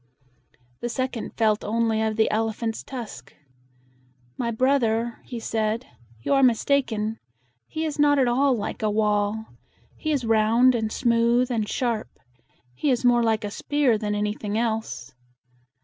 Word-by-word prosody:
The 240 Hz, -, -3 dB
second 255 Hz, -1 st, -4 dB
felt 215 Hz, -2 st, +2 dB
only 225 Hz, 0 st, 0 dB
of 220 Hz, -1 st, 0 dB
the 220 Hz, 0 st, +2 dB
elephant's 225 Hz, +1 st, -2 dB
tusk. 225 Hz, -, -8 dB, 1.0 s
"My 235 Hz, -, -2 dB
brother," 235 Hz, -2 st, +1 dB
he 240 Hz, -, -6 dB
said, 220 Hz, +2 st, -1 dB, 0.4 s
"you -, -, +1 dB
are 275 Hz, -, +4 dB
mistaken. 230 Hz, -3 st, +1 dB, 0.5 s
He 320 Hz, +1 st, -3 dB
is 300 Hz, -1 st, -4 dB
not 290 Hz, 0 st, +5 dB
at 260 Hz, -2 st, +3 dB
all 260 Hz, +2 st, +3 dB
like 210 Hz, -, -4 dB
a 215 Hz, -, +1 dB
wall. 210 Hz, 0 st, +1 dB, 0.5 s
He 310 Hz, -, -3 dB
is 275 Hz, -5 st, 0 dB
round 225 Hz, +3 st, +4 dB
and 220 Hz, -2 st, -1 dB
smooth 235 Hz, +1 st, +2 dB
and 220 Hz, -3 st, -1 dB
sharp. 235 Hz, -4 st, -1 dB, 0.6 s
He 125 Hz, -, -1 dB
is 250 Hz, -1 st, +1 dB
more 240 Hz, -1 st, +5 dB
like 220 Hz, -2 st, +1 dB
a 205 Hz, -, -4 dB
spear 285 Hz, 0 st, +1 dB
than 210 Hz, -1 st, -2 dB
anything 210 Hz, 0 st, -2 dB
else." 220 Hz, -, -2 dB
230 Hz, 150 wpm, -24 LUFS, 215-250 Hz, 1.0 s, not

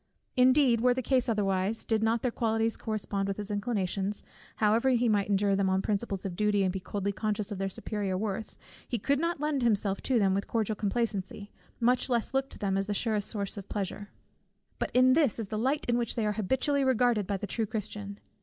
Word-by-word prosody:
Indeed 255 Hz, -2 st, +5 dB
were 250 Hz, 0 st, +4 dB
the 260 Hz, -, -2 dB
case 255 Hz, 0 st, +2 dB
otherwise, 200 Hz, 0 st, 0 dB
did 220 Hz, -1 st, +1 dB
not 225 Hz, +1 st, +1 dB
their 250 Hz, -, +1 dB
qualities 225 Hz, -1 st, 0 dB
correspond 205 Hz, -2 st, -2 dB
with 195 Hz, -, -2 dB
his 210 Hz, 0 st, -4 dB
inclinations; 205 Hz, -2 st, -1 dB, 0.3 s
however 220 Hz, +4 st, +3 dB
he 245 Hz, -1 st, +3 dB
might 205 Hz, -2 st, +1 dB
endure 200 Hz, 0 st, +2 dB
them 195 Hz, -1 st, +1 dB
on 190 Hz, 0 st, +1 dB
principles 200 Hz, -2 st, -2 dB
of 185 Hz, -3 st, -3 dB
duty, 210 Hz, 0 st, +2 dB
and 185 Hz, -1 st, 0 dB
be 190 Hz, -, -3 dB
coldly 200 Hz, +1 st, -3 dB
conscious 210 Hz, 0 st, -2 dB
of 200 Hz, -, -4 dB
their 195 Hz, 0 st, -1 dB
superior 195 Hz, -1 st, -3 dB
worth, 210 Hz, +1 st, -4 dB, 0.3 s
he 240 Hz, -, -1 dB
could 275 Hz, +6 st, +1 dB
not 335 Hz, 0 st, -1 dB
lend 300 Hz, -2 st, 0 dB
himself 205 Hz, -4 st, +1 dB
to 260 Hz, -, +1 dB
them 195 Hz, -3 st, +3 dB
with 200 Hz, +1 st, -1 dB
cordial 220 Hz, -2 st, -1 dB
complacency, 205 Hz, -2 st, -2 dB, 0.3 s
much 250 Hz, +2 st, +2 dB
less 240 Hz, +1 st, 0 dB
look 270 Hz, 0 st, 0 dB
to -, -, -7 dB
them 195 Hz, -2 st, 0 dB
as 195 Hz, -, -2 dB
the 205 Hz, -, -1 dB
surest 215 Hz, -2 st, 0 dB
source 200 Hz, -2 st, -3 dB
of 200 Hz, -1 st, -8 dB
pleasure. 205 Hz, 0 st, -4 dB, 0.7 s
But -, -, -1 dB
this 255 Hz, +1 st, +4 dB
is 220 Hz, -4 st, -4 dB
the 215 Hz, -, -2 dB
light 270 Hz, +6 st, 0 dB
in 240 Hz, 0 st, +2 dB
which 235 Hz, -2 st, -1 dB
they 225 Hz, -, 0 dB
are 210 Hz, -, +1 dB
habitually 265 Hz, +7 st, +1 dB
regarded 245 Hz, -5 st, +2 dB
by 200 Hz, -, -1 dB
the 200 Hz, -, -5 dB
true 220 Hz, +2 st, -2 dB
Christian. 205 Hz, -1 st, -5 dB
215 Hz, 215 wpm, -29 LUFS, 200-240 Hz, 0.7 s, Indeed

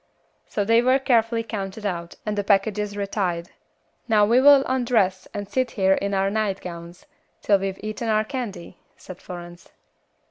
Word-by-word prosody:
So 205 Hz, -, -2 dB
they 230 Hz, +2 st, +4 dB
were 255 Hz, +2 st, +4 dB
carefully 230 Hz, -4 st, +1 dB
counted 210 Hz, -1 st, -6 dB
out, 170 Hz, -3 st, -4 dB
and 210 Hz, -1 st, -2 dB
the 205 Hz, -, -1 dB
packages 205 Hz, 0 st, +1 dB
retied. 185 Hz, -4 st, -2 dB, 0.6 s
"Now 215 Hz, -3 st, +4 dB
we 235 Hz, +4 st, +4 dB
will 280 Hz, 0 st, +7 dB
undress 230 Hz, -8 st, +1 dB
and 205 Hz, -1 st, -5 dB
sit 255 Hz, +4 st, -1 dB
here 190 Hz, -1 st, +4 dB
in 200 Hz, +1 st, -1 dB
our 195 Hz, +1 st, +1 dB
nightgowns, 180 Hz, -5 st, -4 dB, 0.4 s
till 200 Hz, -2 st, +4 dB
we've 195 Hz, 0 st, -4 dB
eaten 215 Hz, +2 st, -4 dB
our 215 Hz, 0 st, +2 dB
candy," 220 Hz, -8 st, -6 dB, 0.2 s
said 185 Hz, -1 st, -11 dB
Florence. 175 Hz, -1 st, -10 dB
205 Hz, 155 wpm, -23 LUFS, 190-230 Hz, 0.6 s, will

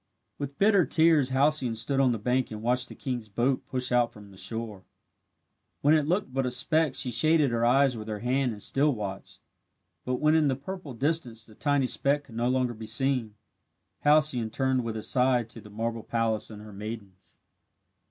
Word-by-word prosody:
With 140 Hz, -1 st, -5 dB
bitter 200 Hz, -2 st, +4 dB
tears 160 Hz, -5 st, +3 dB
Halcyone 135 Hz, -2 st, +2 dB
stood 125 Hz, +5 st, 0 dB
on 130 Hz, -2 st, +4 dB
the 115 Hz, -, -1 dB
bank 125 Hz, +4 st, 0 dB
and 110 Hz, 0 st, -8 dB
watched 125 Hz, +1 st, +1 dB
the -, -, -10 dB
king's 120 Hz, -5 st, -5 dB
boat 120 Hz, +6 st, -1 dB
push 130 Hz, -1 st, -3 dB
out 120 Hz, -1 st, +2 dB
from 100 Hz, -2 st, -14 dB
shore. 110 Hz, -1 st, -5 dB, 1.0 s
When 145 Hz, +2 st, +4 dB
it 155 Hz, -2 st, +2 dB
looked 175 Hz, -6 st, -1 dB
but 135 Hz, -1 st, 0 dB
a -, -, 0 dB
speck 155 Hz, +4 st, +2 dB
she 125 Hz, -, -2 dB
shaded 150 Hz, +3 st, +3 dB
her 115 Hz, 0 st, 0 dB
eyes 130 Hz, +2 st, +3 dB
with 110 Hz, -1 st, -7 dB
her 105 Hz, -1 st, -3 dB
hand 125 Hz, +3 st, 0 dB
and 105 Hz, -2 st, -6 dB
still 140 Hz, 0 st, +1 dB
watched. 100 Hz, -3 st, -7 dB, 0.6 s
But 125 Hz, -, -1 dB
when 150 Hz, +4 st, +2 dB
in 160 Hz, -2 st, +3 dB
the 135 Hz, -, +1 dB
purple 145 Hz, -1 st, -8 dB
distance 125 Hz, -5 st, 0 dB
the 110 Hz, -, -10 dB
tiny 145 Hz, +3 st, 0 dB
speck 140 Hz, +3 st, +1 dB
could 120 Hz, -5 st, -15 dB
no 120 Hz, +2 st, 0 dB
longer 125 Hz, -1 st, 0 dB
be 110 Hz, -1 st, -9 dB
seen, 120 Hz, -2 st, +1 dB, 0.7 s
Halcyone 145 Hz, -6 st, +3 dB
turned 130 Hz, +2 st, 0 dB
with 115 Hz, -1 st, -4 dB
a 110 Hz, -, -6 dB
sigh 125 Hz, -1 st, +2 dB
to 115 Hz, 0 st, -11 dB
the 105 Hz, -, -14 dB
marble 115 Hz, +2 st, -3 dB
palace 115 Hz, -1 st, -1 dB
and 105 Hz, -1 st, -10 dB
her 105 Hz, -1 st, -11 dB
maidens. 100 Hz, -2 st, -9 dB
125 Hz, 195 wpm, -27 LUFS, 115-140 Hz, 1.0 s, bitter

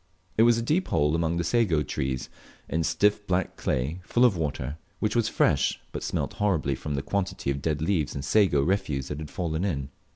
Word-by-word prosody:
It -, -, +3 dB
was 115 Hz, 0 st, +6 dB
a 115 Hz, -, -1 dB
deep 160 Hz, +10 st, +1 dB
hole 75 Hz, -1 st, +2 dB
among 85 Hz, 0 st, 0 dB
the 85 Hz, -, 0 dB
Sago 90 Hz, -9 st, +2 dB
trees, 65 Hz, -1 st, -3 dB, 0.4 s
in 80 Hz, +1 st, 0 dB
stiff 105 Hz, +4 st, +2 dB
black 90 Hz, 0 st, 0 dB
clay, 70 Hz, +8 st, -2 dB
full 120 Hz, +6 st, +3 dB
of 115 Hz, -6 st, +4 dB
water, 75 Hz, -3 st, -3 dB, 0.2 s
which 105 Hz, 0 st, -1 dB
was 115 Hz, -2 st, +2 dB
fresh, -, -, +2 dB
but -, -, -5 dB
smelt -, -, -2 dB
horribly 80 Hz, -9 st, +2 dB
from 75 Hz, +2 st, -4 dB
the 70 Hz, -, -2 dB
quantity 95 Hz, -7 st, -1 dB
of 70 Hz, 0 st, -3 dB
dead 75 Hz, 0 st, -1 dB
leaves 80 Hz, -5 st, 0 dB
and 70 Hz, -1 st, -4 dB
sago 75 Hz, -4 st, +4 dB
refuse 75 Hz, -7 st, -1 dB
that 75 Hz, -, -4 dB
had 75 Hz, -1 st, -6 dB
fallen 85 Hz, -1 st, -2 dB
in. 70 Hz, -9 st, -2 dB
80 Hz, 205 wpm, -27 LUFS, 70-100 Hz, 0.4 s, was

